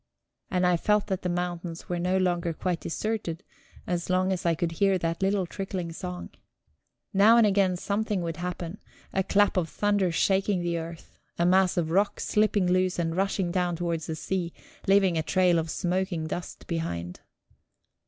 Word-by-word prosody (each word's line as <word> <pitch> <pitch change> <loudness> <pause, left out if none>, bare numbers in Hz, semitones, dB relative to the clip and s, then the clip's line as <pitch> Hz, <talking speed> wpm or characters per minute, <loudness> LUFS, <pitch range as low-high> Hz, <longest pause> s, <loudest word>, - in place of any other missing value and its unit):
And 180 -1 +1
I 180 -1 +4
felt 210 +4 +2
that 190 -3 -2
the 180 - -2
mountains 175 -1 -3
were 175 -1 -2
no 180 +2 +1
longer 175 -2 0
quite 175 +1 -2
deserted, 195 -3 -3 0.4
as 175 0 -2
long 185 +1 +2
as 180 -1 -2
I 165 - +3
could 165 +1 -1
hear 195 +3 +2
that 165 0 -2
little 195 -1 +2
trickling 185 -2 -4
song. 180 +1 -6 0.8
Now 210 +4 +6
and 230 - +6
again 195 -3 +2
something 205 0 -1
would 165 -1 -3
happen: 175 +1 -5 0.3
a 190 - +2
clap 200 +1 +2
of 170 -3 +1
thunder 205 -2 +1
shaking 190 +1 +1
the 170 -1 -1
earth, 165 0 -9 0.2
a 170 - +2
mass 185 0 +4
of 160 -2 0
rock 200 +4 +2
slipping 210 -2 +2
loose 185 0 +2
and 165 -1 -1
rushing 190 -1 0
down 180 -1 0
towards 165 -2 -2
the 160 - -3
sea, 175 +1 -3 0.3
leaving 195 -4 +4
a - - +2
trail 180 +1 +3
of 160 0 -3
smoking 180 -1 -1
dust 175 +2 -6
behind. 90 - -4
180 Hz, 175 wpm, -27 LUFS, 170-195 Hz, 0.8 s, Now